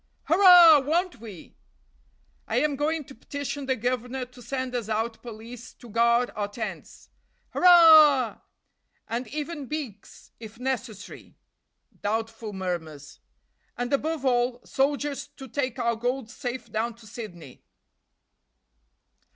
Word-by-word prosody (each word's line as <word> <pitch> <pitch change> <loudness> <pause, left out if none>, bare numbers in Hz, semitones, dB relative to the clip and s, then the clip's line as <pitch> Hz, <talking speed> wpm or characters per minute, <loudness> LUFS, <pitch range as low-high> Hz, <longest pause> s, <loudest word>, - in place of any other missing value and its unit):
"Hurrah! 350 -3 +8
won't 315 - -1
we?" 210 -7 -11 0.9
"I 225 - -3
am 285 +3 +1
going 305 +3 -1
to 270 - -14
petition 285 +2 -6
the 260 - +1
governor 250 +2 -3
to 250 0 -17
send 260 0 -4
us 235 -3 -3
out 225 +1 -2
police 235 +1 -10
to 240 - -15
guard 235 +2 +2
our 205 -1 -2
tents." 215 +1 -8 0.4
"Hurrah!" 315 -8 +6 0.7
"And 235 +2 -4
even 295 +2 -5
beaks, 260 -10 -8
if 220 -1 -11
necessary" 240 -5 -6 0.6
(doubtful 225 +1 -3
murmurs). 170 -6 -6 0.6
"And, 245 +2 -3
above 305 +1 -1
all, 245 -1 0
soldiers 285 +1 -1
to 270 - -9
take 255 -1 -3
our 235 -2 0
gold 245 +1 -3
safe 255 -1 -6
down 225 +1 -2
to 230 -1 -18
Sydney." 200 - -10
245 Hz, 120 wpm, -26 LUFS, 225-285 Hz, 0.9 s, Hurrah